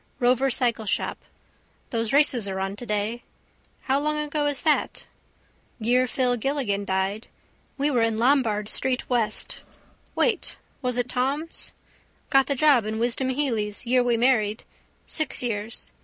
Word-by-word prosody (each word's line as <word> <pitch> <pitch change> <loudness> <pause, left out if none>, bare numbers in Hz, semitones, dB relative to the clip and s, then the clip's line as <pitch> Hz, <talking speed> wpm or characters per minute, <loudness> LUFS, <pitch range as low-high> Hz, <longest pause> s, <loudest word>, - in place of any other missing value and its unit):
Rover 255 +2 +3
cycleshop. 235 -4 0 0.7
Those 230 -3 -1
races 270 -7 +4
are 190 0 -3
on 195 +1 -3
today. 210 +1 -2 0.6
How 270 +1 +1
long 300 +1 -1
ago 300 0 -1
is 285 -2 0
that? 310 -2 +1 0.7
Year 250 +3 +2
Phil 250 -1 +1
Gilligan 230 -6 -1
died. 190 +3 -1 0.5
We 290 +1 +1
were 245 -4 +2
in 225 -1 +1
Lombard 230 -4 +2
street 255 +2 +1
west. 225 -3 0 0.5
Wait: 440 -7 0 0.2
was 250 -2 0
in 245 0 0
Thom's. 275 +6 -2 0.6
Got 270 -1 +5
the 280 - 0
job 265 -6 +4
in 220 0 -3
Wisdom 240 +3 0
Hely's 235 -6 -1
year 250 +1 +3
we 240 -1 +1
married. 225 -3 +2 0.4
Six 310 -5 -1
years. 220 -1 -3
245 Hz, 140 wpm, -25 LUFS, 220-270 Hz, 0.7 s, Got